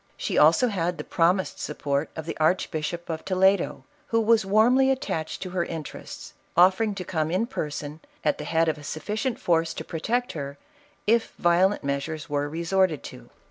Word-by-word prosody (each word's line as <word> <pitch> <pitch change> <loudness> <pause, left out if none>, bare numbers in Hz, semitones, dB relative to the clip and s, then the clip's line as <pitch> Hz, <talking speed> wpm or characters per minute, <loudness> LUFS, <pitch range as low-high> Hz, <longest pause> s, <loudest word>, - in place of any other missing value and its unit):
She - - -3
also 165 +11 +5
had 175 -4 -1
the - - -5
promised 180 +3 +1
support 140 +1 -2
of 160 - -5
the 165 - -4
Archbishop 170 0 0
of 160 -1 -4
Toledo, 190 0 +2 0.2
who 230 - +2
was 225 0 +4
warmly 245 +6 +4
attached 180 - -2
to 185 - -6
her 180 -1 0
interests, 160 -3 -7 0.2
offering 190 +4 +4
to 185 - -4
come 155 -3 -1
in 185 +7 +1
person, 150 - -5 0.3
at 150 - +1
the - - -4
head 165 +2 +2
of 155 -1 -1
a - - -12
sufficient 210 - -3
force 165 -1 +1
to - - -6
protect 240 +10 -1
her, 140 -2 -6 0.5
if 225 +2 +2
violent 175 +3 +3
measures 140 +3 -3
were 145 -1 -1
resorted 170 0 +1
to. - - -13
170 Hz, 175 wpm, -26 LUFS, 155-200 Hz, 0.5 s, also